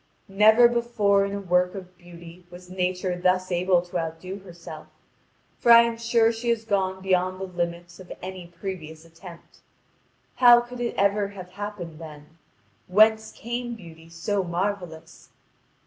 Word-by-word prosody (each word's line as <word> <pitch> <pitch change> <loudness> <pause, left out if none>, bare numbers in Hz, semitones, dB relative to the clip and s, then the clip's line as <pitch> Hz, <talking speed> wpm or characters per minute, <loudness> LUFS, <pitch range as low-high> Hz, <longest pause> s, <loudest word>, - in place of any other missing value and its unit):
Never 215 +4 +6
before 235 -4 +1
in 200 - -5
a - - -3
work 180 0 +1
of 185 -1 -10
beauty 175 0 -14
was 180 +1 -13
Nature 185 0 -2
thus 185 +1 0
able 180 0 +2
to 175 0 -4
outdo 165 +4 -6
herself, 170 -4 -11 0.7
for 235 - +4
I 235 0 +10
am 235 0 -2
sure 230 0 +2
she 235 +1 -4
has 230 -1 0
gone 190 -3 -1
beyond 185 0 0
the - - -5
limits 175 -1 -5
of 185 - -12
any 185 -1 -8
previous 165 -3 -8
attempt. 165 +1 -15 0.8
How 240 -1 +8
could 240 +1 -8
it 240 -1 -3
ever 200 +1 +2
have 185 -3 -11
happened 190 -6 -7
then? 155 0 -12 0.5
Whence 220 +3 +4
came 240 +1 -5
beauty 165 -5 -14
so 190 +4 -2
marvellous? 180 -2 -5
185 Hz, 150 wpm, -25 LUFS, 175-210 Hz, 0.8 s, I